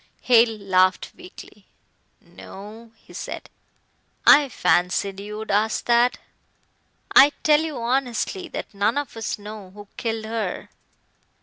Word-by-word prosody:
Hale 230 -2 +4
laughed 185 -2 +1
weakly. 365 0 -14 0.5
"No!" 220 +4 -12
he - - -19
said. - - -7 0.7
"I 290 -2 +7
fancied 180 0 0
you 210 +1 -7
would 220 -1 -5
ask 215 +2 0
that. 240 +1 +3 1.0
I 285 +2 +8
tell 300 0 +4
you 315 -4 -4
honestly 240 -4 -2
that - - -7
none 205 +6 0
of 290 -4 -4
us 225 -1 -4
know 210 -2 -10
who 205 +2 -13
killed 225 -2 -3
her." 225 0 -4
220 Hz, 125 wpm, -23 LUFS, 200-245 Hz, 1.0 s, I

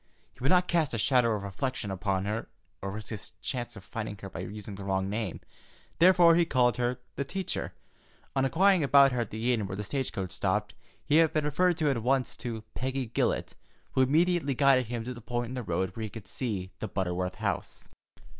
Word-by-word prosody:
He - - -24
would 130 +2 +1
not 180 0 +4
cast 160 -7 +1
a - - -1
shadow 120 0 +3
of 100 - -4
reflection 105 +2 -3
upon 95 0 -1
her, 105 +2 -3 0.3
or 100 - -3
risk 105 +2 -6
his 105 -3 -6
chance 120 -3 -4
of 95 - -10
finding 105 -1 -5
her 100 - -6
by - - -7
using 105 +2 -7
the 100 0 -7
wrong 95 0 -1
name, 105 -4 -3 0.6
therefore 175 -1 +7
he 170 +1 +5
called 125 -7 +2
her 125 0 0 0.2
"the 140 - 0
teacher." 190 +6 -3 0.6
On 135 - +2
inquiring 185 +5 +4
about 140 0 +6
her 125 -1 0
at 115 - -3
the 115 +3 0
inn 110 -4 -1
where 95 - -5
the 105 - -4
stage 130 +5 -2
coach 95 -3 -4
stopped, 105 +4 0 0.3
he 150 +1 +4
had 165 -1 +5
been 155 -1 +1
referred 175 +4 +2
at 135 -6 +2
once 130 +1 +1
to 115 -3 -5
Peggy 130 0 -2
Gillette, - - 0 0.4
who 130 - +2
immediately 155 +1 +3
guided 135 -3 +4
him 120 -1 -3
to 125 +2 -5
the 120 - -10
point 120 +1 -3
in - - -6
the 125 - -3
road 95 -2 -2
where 115 - -5
he 110 - -3
could 105 -1 -10
see 100 -6 -2
the 110 - -3
Butterworth 90 -1 -2
house. - - -3
120 Hz, 215 wpm, -29 LUFS, 100-140 Hz, 0.6 s, therefore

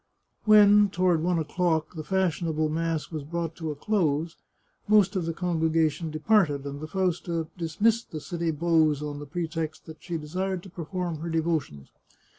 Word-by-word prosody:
When, 210 -1 +7
toward 180 -3 +2
one 175 +1 +1
o'clock, 160 +1 0
the 155 -2 -6
fashionable 165 -3 0
mass 165 0 -2
was 155 -3 -4
brought 165 +2 -4
to 160 -3 -4
a 150 - -3
close, 160 -3 0 0.5
most 205 -1 +4
of 175 -3 -1
the - - 0
congregation 160 -2 0
departed, 155 -3 +2
and 140 +1 -6
the 155 - -5
Fausta 175 -2 -1
dismissed 205 +8 0
the 155 - -5
city 170 +1 -3
beaux 160 -1 +3
on 145 -1 -6
the 145 - -8
pretext 165 -1 -4
that 160 -1 -11
she 170 -2 -4
desired 180 +4 -3
to 190 - -12
perform 175 -1 -4
her 170 +2 -4
devotions. 160 - -2
165 Hz, 165 wpm, -27 LUFS, 155-180 Hz, 0.5 s, When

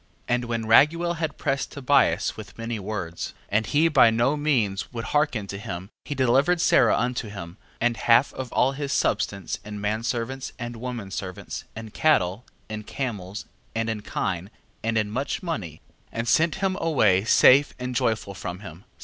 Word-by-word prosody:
10:10. 120 - +3
And 125 0 -3
when 115 -1 -2
Raguel 165 +9 +4
had 160 -2 -3
pressed 135 -1 -1
Tobias 140 0 +2
with 100 -3 -10
many 115 -1 -4
words, 95 -4 -5
and 110 +2 +1
he 155 +3 +3
by 145 -7 +6
no 120 +6 +2
means 125 -10 0
would 115 -2 -5
hearken 145 -8 0
to 100 0 -6
him, 95 0 -6
he 145 - -4
delivered 135 +7 +3
Sara 120 -7 +4
unto 120 -2 -1
him, 90 -3 -8 0.2
and 120 0 +1
half 120 +4 +4
of 130 -2 -6
all 130 - +3
his 140 0 -4
substance 100 -7 0
in 105 0 -7
menservants, 115 +5 -2
and 120 -1 -6
womenservants, 100 -6 -6
in 110 -1 -8
cattle, 105 - +2 0.2
in 110 0 -5
camels, 105 -5 -5 0.3
and 115 0 0
in 110 -2 -4
kine, 90 -2 -3 0.3
and 115 0 0
in 105 -1 0
much 135 - -2
money, 100 - -5 0.3
and 115 +1 -3
sent 160 +5 +3
him 190 -1 0
away 110 - +3
safe 130 +5 +6
and 125 0 -4
joyful 110 -4 0
from 90 0 -6
him, 85 -6 -9
10:11. 95 - -20
115 Hz, 175 wpm, -25 LUFS, 105-135 Hz, 0.3 s, by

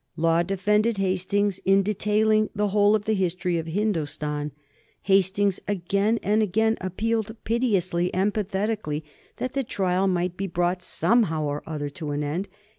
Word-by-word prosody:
Law 165 +1 +3
defended 210 +4 +1
Hastings 195 +1 0
in 195 +1 +3
detailing 215 +1 +2
the 205 0 +1
whole 205 +1 +4
of 210 -1 -2
the 220 - +1
history 180 -2 0
of 165 - -5
Hindostan. 150 -6 -2 0.5
Hastings 195 0 +2
again 200 +3 +1
and 210 +2 +2
again 220 +2 +2
appealed 220 +4 -2
piteously 190 -7 0
and 195 +3 +1
pathetically 200 -6 -2 0.3
that 255 - -3
the 275 - 0
trial 190 -4 0
might 180 -1 0
be 195 - -2
brought 175 +1 0
somehow 185 -6 +1
or 145 0 -2
other 150 -2 -3
to 150 +2 -6
an 145 0 -2
end. 165 +7 -2
195 Hz, 150 wpm, -25 LUFS, 175-210 Hz, 0.5 s, whole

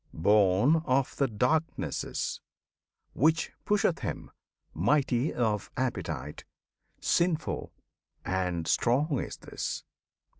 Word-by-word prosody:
born 100 - +4
of 130 0 +1
the 140 - +2
Darknesses, 125 +9 -1 0.7
Which 160 +4 +2 0.2
pusheth 200 -5 +2
him. - - -5 0.4
Mighty 130 - +2
of 110 -4 -1
appetite, 85 - -3 0.6
Sinful, 170 -2 0 0.5
and 90 -3 -1
strong 135 +4 +2
is - - -5
this! - - -5
125 Hz, 85 wpm, -29 LUFS, 95-150 Hz, 0.7 s, born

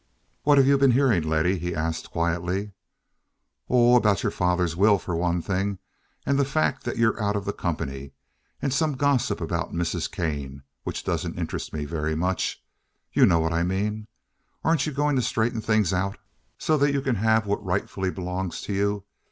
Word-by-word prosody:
"What 145 -1 +4
have 135 - +6
you 140 0 +4
been 135 -2 +5
hearing, 130 -11 +3
Letty?" 80 +4 +1
he 85 0 -3
asked, 80 +1 -3
quietly. 90 +4 -1 1.0
"Oh, 120 0 +5
about 105 -6 +3
your - - +1
father's 90 -2 0
will 100 +3 +5
for 90 -2 -4
one 85 0 0
thing, 95 +1 -1 0.5
and 140 0 +2
the - - +4
fact 140 -1 0
that 120 - -3
you're 115 0 +2
out 105 0 0
of 100 -1 -2
the 100 - -2
company, 70 -5 -4 0.5
and 135 - 0
some 155 +1 +1
gossip 140 -2 +1
about - - -3
Mrs. 85 -1 -1
Kane 70 -4 -4 0.2
which - - -4
doesn't - - -2
interest - - -4
me 75 -1 -4
very 80 0 -2
much. 90 +3 -1 0.5
You - - +6
know 85 - +4
what 80 0 0
I 85 - +1
mean. 105 +4 -1 0.6
Aren't 160 -2 +2
you - - -2
going 145 +1 +1
to - - +3
straighten 115 -1 0
things 110 -4 +2
out, 95 +2 -1 0.4
so 155 - +1
that 140 0 +3
you 140 - +1
can 130 -5 0
have 110 +1 +3
what 100 0 -1
rightfully 95 0 -1
belongs 90 -1 -4
to 100 - -4
you? 100 0 0
100 Hz, 185 wpm, -25 LUFS, 85-120 Hz, 1.0 s, have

